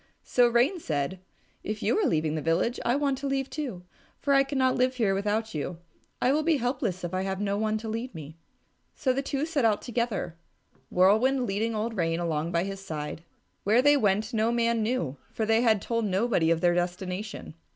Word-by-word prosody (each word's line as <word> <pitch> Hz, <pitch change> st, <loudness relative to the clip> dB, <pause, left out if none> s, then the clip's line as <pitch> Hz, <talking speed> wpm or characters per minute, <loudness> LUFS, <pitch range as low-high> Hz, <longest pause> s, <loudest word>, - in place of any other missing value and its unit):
So 245 Hz, -1 st, +4 dB
Rain 245 Hz, +10 st, +2 dB
said, 155 Hz, -, -2 dB, 0.4 s
"If 215 Hz, +1 st, -4 dB
you -, -, +2 dB
are 415 Hz, -, +2 dB
leaving 155 Hz, -1 st, +1 dB
the 155 Hz, -, -2 dB
village, 165 Hz, -, 0 dB
I 240 Hz, -, +2 dB
want 280 Hz, -2 st, 0 dB
to 280 Hz, -, -3 dB
leave 270 Hz, 0 st, 0 dB
it -, -, -24 dB
too, 255 Hz, -, -5 dB, 0.3 s
for 280 Hz, -, +1 dB
I 275 Hz, -, +6 dB
cannot 265 Hz, -2 st, +1 dB
live 255 Hz, +1 st, +1 dB
here 220 Hz, -6 st, +2 dB
without 210 Hz, +3 st, -1 dB
you. 160 Hz, +3 st, -4 dB, 0.4 s
I 255 Hz, -, +3 dB
will 305 Hz, -, +2 dB
be 320 Hz, -1 st, +2 dB
helpless 245 Hz, -7 st, -2 dB
if 175 Hz, +1 st, -4 dB
I 185 Hz, -, 0 dB
have 190 Hz, 0 st, -2 dB
no 200 Hz, -1 st, 0 dB
one 215 Hz, +1 st, 0 dB
to 220 Hz, +1 st, -7 dB
lead 230 Hz, +1 st, -4 dB
me." 155 Hz, -1 st, -8 dB, 0.6 s
So 260 Hz, -3 st, +1 dB
the 270 Hz, -, -1 dB
two 280 Hz, +1 st, -2 dB
set 315 Hz, -5 st, -1 dB
out 215 Hz, -2 st, +2 dB
together, 235 Hz, -8 st, -2 dB, 0.5 s
Whirlwind 225 Hz, +8 st, +3 dB
leading 220 Hz, +2 st, -1 dB
old 225 Hz, +2 st, -2 dB
Rain 165 Hz, -3 st, 0 dB
along 165 Hz, -1 st, -1 dB
by 170 Hz, 0 st, +1 dB
his 195 Hz, 0 st, -6 dB
side. 155 Hz, -3 st, -5 dB, 0.4 s
Where 225 Hz, +5 st, +4 dB
they 290 Hz, +1 st, +6 dB
went 215 Hz, -2 st, +1 dB
no 225 Hz, +1 st, +2 dB
man 235 Hz, -1 st, +1 dB
knew, 215 Hz, -, -1 dB
for 220 Hz, -, -2 dB
they 225 Hz, +1 st, +3 dB
had 220 Hz, -4 st, +3 dB
told 230 Hz, -1 st, -1 dB
nobody 195 Hz, -3 st, +1 dB
of 165 Hz, 0 st, +2 dB
their 175 Hz, -1 st, +4 dB
destination. 180 Hz, +3 st, -3 dB
220 Hz, 210 wpm, -27 LUFS, 180-250 Hz, 0.6 s, I